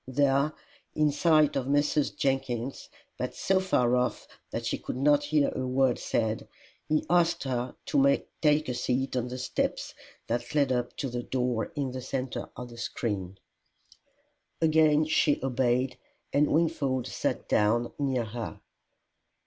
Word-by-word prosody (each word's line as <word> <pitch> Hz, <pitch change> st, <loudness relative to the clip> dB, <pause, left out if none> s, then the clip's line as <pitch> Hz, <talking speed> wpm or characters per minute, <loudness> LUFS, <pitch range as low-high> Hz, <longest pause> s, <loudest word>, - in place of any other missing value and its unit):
There, 140 Hz, +2 st, +2 dB, 0.4 s
in 150 Hz, -1 st, +3 dB
sight 155 Hz, 0 st, +3 dB
of 130 Hz, -2 st, -1 dB
Mrs. 145 Hz, +1 st, +1 dB
Jenkins, 130 Hz, -2 st, -2 dB, 0.3 s
but -, -, -3 dB
so 190 Hz, 0 st, +2 dB
far 125 Hz, -10 st, +2 dB
off 125 Hz, -3 st, -1 dB, 0.2 s
that -, -, -4 dB
she -, -, -1 dB
could -, -, -5 dB
not 145 Hz, +2 st, +3 dB
hear 150 Hz, -1 st, +2 dB
a 130 Hz, -, -3 dB
word 130 Hz, -1 st, +2 dB
said, 110 Hz, -1 st, -1 dB, 0.4 s
he 155 Hz, 0 st, +1 dB
asked 175 Hz, -1 st, +2 dB
her 125 Hz, -2 st, -2 dB
to 140 Hz, 0 st, +4 dB, 0.2 s
take 150 Hz, 0 st, +3 dB
a 125 Hz, -, -1 dB
seat 125 Hz, +2 st, -1 dB
on 125 Hz, -1 st, 0 dB
the 125 Hz, +1 st, -5 dB
steps 125 Hz, -, -2 dB, 0.3 s
that 120 Hz, +4 st, -3 dB
led 140 Hz, -3 st, +3 dB
up 125 Hz, -1 st, -1 dB
to 135 Hz, -, -2 dB
the 120 Hz, 0 st, -3 dB
door 125 Hz, -2 st, -1 dB
in 140 Hz, -3 st, -2 dB
the 130 Hz, 0 st, -5 dB
centre 130 Hz, 0 st, -4 dB
of 125 Hz, 0 st, -6 dB
the 120 Hz, -, -12 dB
screen. 100 Hz, -5 st, -3 dB, 1.2 s
Again 155 Hz, -1 st, +4 dB
she 155 Hz, -1 st, +2 dB
obeyed, 130 Hz, 0 st, 0 dB, 0.3 s
and 145 Hz, +1 st, +3 dB
Wingfold 150 Hz, -6 st, +1 dB
sat -, -, -2 dB
down 115 Hz, +3 st, +2 dB
near 130 Hz, -4 st, 0 dB
her. 115 Hz, 0 st, -6 dB
130 Hz, 150 wpm, -28 LUFS, 125-145 Hz, 1.2 s, to